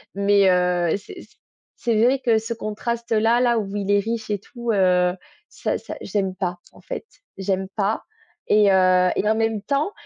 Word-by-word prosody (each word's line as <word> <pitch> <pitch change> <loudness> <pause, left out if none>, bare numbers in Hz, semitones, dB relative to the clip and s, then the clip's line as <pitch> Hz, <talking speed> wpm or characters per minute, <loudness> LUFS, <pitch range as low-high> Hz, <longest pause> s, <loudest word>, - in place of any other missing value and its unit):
Mais 200 -1 +4
heu, 180 -2 +2
c'est - - -11
c - - -19 0.4
c'est 235 -3 0
vrai 255 +3 +3
que 230 -4 +2
ce 225 +1 -4
contraste-là, 230 +1 0
là 240 -2 +3
où 200 -1 -5
il 200 0 -1
est 205 - +4
riche 225 +1 -4
et 205 - -1
tout, 235 +2 -5
heu, 180 -2 +3 0.4
ça - - -2
ça - - -8
j'aime 195 -2 -2
pas, 180 -2 -3 0.2
en - - -17
fait. - - -6 0.3
J'aime 190 0 -1
pas 210 +1 -1 0.4
et 210 -2 +5
heu, 185 -1 +4
et 210 - +1
en 220 - +3
même 225 -2 0
temps 285 - 0
205 Hz, 185 wpm, -22 LUFS, 190-230 Hz, 0.4 s, et